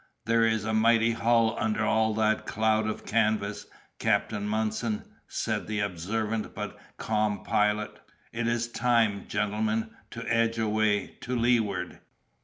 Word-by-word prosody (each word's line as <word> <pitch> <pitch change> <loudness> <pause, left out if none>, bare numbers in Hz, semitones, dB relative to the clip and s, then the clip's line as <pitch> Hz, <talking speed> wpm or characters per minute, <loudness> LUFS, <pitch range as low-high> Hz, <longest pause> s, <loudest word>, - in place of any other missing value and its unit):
"There 115 0 +3
is 110 -1 0
a 110 - -1
mighty 115 +1 +4
hull 115 0 +2
under 110 0 0
all 110 0 +2
that 110 0 +1
cloud 110 0 +1
of 110 - -4
canvas, 105 -2 0 0.3
Captain 105 -2 0
Munson," 110 +1 -1 0.2
said - - -2
the 105 -1 -2
observant 105 +4 -2
but - - -5 0.2
calm 105 -2 0
Pilot; 105 0 0 0.3
"it 115 0 -1
is 120 0 0
time, 115 -4 +1
gentlemen, 105 +2 -1 0.2
to 115 0 -7
edge 115 -1 +2
away, 110 -2 0
to 125 +1 -3
leeward." 115 -5 +1
110 Hz, 135 wpm, -28 LUFS, 105-115 Hz, 0.3 s, mighty